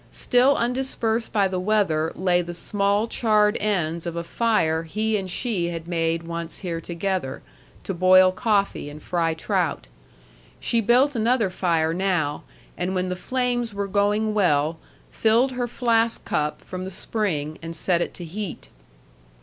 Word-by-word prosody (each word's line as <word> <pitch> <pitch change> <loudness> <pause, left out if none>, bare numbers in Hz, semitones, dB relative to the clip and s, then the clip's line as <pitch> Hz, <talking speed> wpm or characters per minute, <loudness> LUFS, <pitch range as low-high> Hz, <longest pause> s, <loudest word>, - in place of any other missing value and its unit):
Still 255 +3 +3
undispersed 240 -2 -1
by 200 -3 +3
the 185 -1 -2
weather 180 -6 +1
lay 180 -1 +2
the 175 0 -6
small 200 +4 +1
charred 210 -3 +2
ends 170 -5 -1
of 170 - -4
a 170 - -3
fire 170 -5 +1
he 215 +7 -1
and 190 -2 -2
she 195 -3 -1
had 165 -1 -5
made 165 -1 0
once 170 0 -5
here 165 -2 -3
together, 175 -5 -3 0.4
to 195 - -3
boil 185 +1 +6
coffee 200 -6 0
and 150 +1 -11
fry 165 -2 0
trout. 160 - -1 0.7
She 230 -1 +1
built 250 +6 +3
another 230 -3 +2
fire 165 -3 +1
now, 175 -5 0 0.3
and 180 +2 -2
when 185 0 0
the 180 - -2
flames 245 +1 -1
were 200 0 -2
going 205 +2 +1
well, 160 -5 +2 0.3
filled 230 +4 +3
her 250 -1 -2
flask 230 -1 +1
cup 150 0 -1
from 185 0 -6
the 190 - -5
spring 175 -6 -3
and 165 0 -6
set 175 +1 +1
it - - -3
to 175 - -6
heat. 175 - -6
185 Hz, 160 wpm, -24 LUFS, 170-220 Hz, 0.7 s, boil